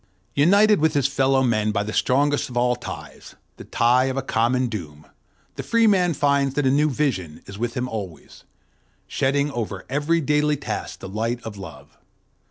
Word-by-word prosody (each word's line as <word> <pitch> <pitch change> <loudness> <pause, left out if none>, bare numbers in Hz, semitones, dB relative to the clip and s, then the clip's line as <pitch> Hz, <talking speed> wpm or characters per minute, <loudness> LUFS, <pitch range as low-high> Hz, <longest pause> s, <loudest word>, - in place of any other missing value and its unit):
United 200 +6 +4
with 160 -1 +2
his 140 -2 +3
fellow 135 -1 +2
men 110 -3 +1
by 100 -1 -1
the 110 +1 -5
strongest 145 +2 +1
of 120 - -6
all 125 0 +2
ties, 120 - -10 0.2
the - - -9
tie 125 +2 +2
of 135 0 -2
a 135 - -1
common 125 +1 +1
doom, 80 -10 -7 0.5
the - - -3
free 230 -1 +2
man 180 -6 +3
finds 140 -2 +1
that 145 - 0
a 130 - +3
new 150 +2 +3
vision 110 - -2
is 100 +1 -10
with 120 0 -3
him 125 0 -2
always, 100 -8 -8 0.6
shedding 140 +2 0
over 105 -6 -5
every 150 +4 +1
daily 150 0 +1
task - - -5
the - - -7
light 115 +5 -2
of 110 -2 -7
love. 95 -1 -12
130 Hz, 180 wpm, -22 LUFS, 115-145 Hz, 0.6 s, United